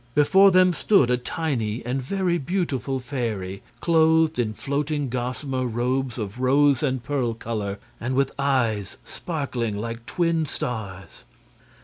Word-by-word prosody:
Before 190 +7 +6
them 185 -1 +5
stood 165 - +3
a 125 - +3
tiny 125 -5 -2
and 130 +2 -1
very 175 +4 0
beautiful 140 -5 -1
fairy, 110 -8 -4 0.2
clothed 160 -2 +3
in 110 -3 0
floating 145 +1 -2
gossamer 130 +1 -2
robes 125 +1 -1
of 105 0 -5
rose 140 +1 +4
and 130 -4 -1
pearl 125 -3 -1
color, 105 -3 -4 0.2
and 130 +3 -2
with 135 0 +2
eyes 120 -8 0
sparkling 130 -10 -3
like 115 +2 -5
twin 165 -2 0
stars. 100 - -6
130 Hz, 130 wpm, -24 LUFS, 115-150 Hz, 0.2 s, Before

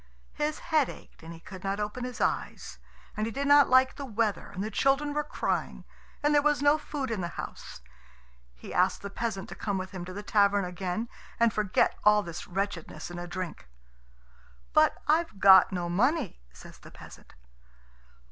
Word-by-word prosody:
His 300 +1 -2 0.2
head 300 -4 +4
ached - - -13
and 165 +1 -10
he 165 - -10
could 185 +2 -11
not 195 +1 -2
open 210 +4 -3
his 250 -1 -7
eyes, - - -2 0.4
and 215 0 -1
he - - -4
did 280 +5 -3
not 285 0 +6
like 260 0 +5
the 285 - -5
weather, 220 -5 -1
and 190 - -5
the 215 - -4
children 280 +4 +1
were 300 0 0
crying, 300 - -3 0.4
and 295 0 +3
there 290 - +5
was 295 0 +2
no 290 +2 +4
food 280 -5 -4
in 215 -4 -2
the 175 - -2
house. - - -8 0.7
He - - -10
asked 180 +2 +1
the 200 - -6
peasant 205 -3 -3
to - - -6
come 200 -2 -2
with 185 0 -5
him 185 -3 -6
to 185 - -8
the 205 +2 -6
tavern 200 -1 +3
again 180 +4 -3 0.3
and 230 -2 +3
forget 210 -3 +1
all 210 0 +5
this 170 -2 -7
wretchedness 180 -4 -4
in 175 - -6
a 175 - -6
drink. 180 - -6 1.1
"But - - +5
I've 310 -9 +1
got 190 -1 +8
no 175 -2 -2
money," 205 - 0
says 65 - -14
the - - -13
peasant. - - -14
210 Hz, 190 wpm, -28 LUFS, 185-265 Hz, 1.1 s, got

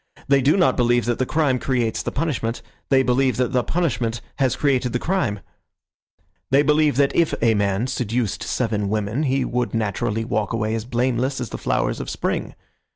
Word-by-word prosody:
They 140 0 +4
do 145 +8 +3
not 180 - +3
believe 120 -1 +2
that 120 -1 -1
the 130 - 0
crime 145 -5 +1
creates 120 -4 0
the - - -4
punishment. 130 -7 -2 0.3
They 135 -1 +4
believe 130 -1 +2
that 125 -1 0
the 125 -1 +2
punishment 125 -9 -1 0.2
has 130 -3 +1
created 130 -4 +1
the - - +2
crime. 125 - -1 1.1
They 140 +2 +4
believe 150 -1 +3
that 140 +1 +2
if 170 -2 +2
a 115 -1 +3
man 100 +1 0
seduced 120 -4 -2
seven 105 -5 -1
women 105 +5 -1
he 135 -3 +1
would 125 -1 -2
naturally 110 +1 -1
walk 110 -1 -1
away 110 -1 -1
as 115 -1 -3
blameless 125 +2 0
as 125 - -4
the - - -5
flowers - - -1
of - - -5
spring. - - -3
125 Hz, 185 wpm, -22 LUFS, 115-135 Hz, 1.1 s, They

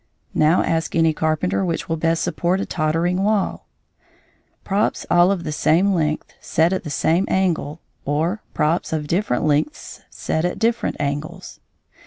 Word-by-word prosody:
Now 155 +4 +3
ask 165 0 -1
any 165 -1 +3
carpenter 160 +5 0
which 170 -3 -2
will 165 - -1
best 165 +1 0
support 180 +2 0
a - - -2
tottering 165 +3 0
wall 205 -1 0 1.0
props 200 +2 0
all 175 +2 +5
of 185 -4 -2
the 155 - -3
same 175 +6 +2
length 155 -3 -1
set 165 +3 +1
at 190 - -2
the 155 - -6
same 165 +6 +1
angle, 165 -5 0 0.2
or 160 +9 -1
props 160 +2 0
of 155 -2 -1
different 170 -4 0
lengths 150 - -1
set 160 - -2
at 180 - -1
different 230 +1 0
angles? 145 +1 -4
165 Hz, 155 wpm, -21 LUFS, 155-185 Hz, 1.0 s, all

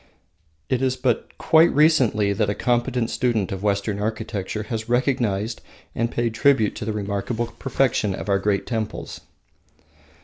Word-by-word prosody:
It 130 -1 0
is 130 -1 +1
but - - -1
quite 160 +1 +5
recently 130 -10 +3
that 105 0 0
a 100 - -1
competent 120 -1 0
student 115 -6 0
of 95 -1 -4
Western 100 0 0
architecture 110 -1 -3
has 110 +1 -5
recognised 120 -4 0 0.3
and 115 +1 -1
paid 120 -1 -1
tribute 115 -3 +3
to - - -5
the 110 - -1
remarkable 105 +3 -2
perfection 125 -6 +1
of - - -7
our 100 -1 +2
great 100 0 0
temples. 110 -3 -4
110 Hz, 145 wpm, -23 LUFS, 105-125 Hz, 0.3 s, quite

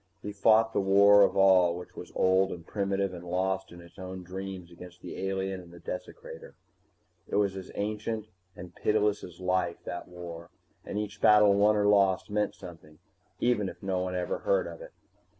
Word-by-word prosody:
He 105 - -4
fought 110 +2 +4
the - - +1
war 100 +1 +6
of 100 - +3
all 95 -3 +5
which 90 - -10
was - - -9
old 95 +1 +3
and 85 -2 -8
primitive 100 -1 -1
and 85 -1 -8
lost 95 +2 -2
in 85 0 -12
its 85 +1 -16
own 95 0 -7
dreams 95 -1 -7
against 90 +1 -13
the - - -7
alien 95 -1 -3
and 85 -1 -15
the 85 - -13
desecrator. 90 +1 -8 0.7
It - - -4
was 100 -2 +1
as 95 -1 -8
ancient 110 +1 -3 0.3
and 90 0 -10
pitiless 105 -1 +1
as 85 -1 -11
life, 90 -2 0
that 85 +2 -6
war, 85 -1 -9 0.3
and - - -6
each 105 0 -5
battle 105 -1 +6
won 105 +2 +4
or 105 -1 +1
lost 100 -2 +3
meant 105 0 0
something 80 -4 -12 0.4
even 110 -5 +1
if 85 - -13
no 95 -1 -1
one 90 0 -3
ever 90 -1 -2
heard - - +1
of - - -9
it. - - -10
95 Hz, 190 wpm, -29 LUFS, 90-105 Hz, 0.7 s, war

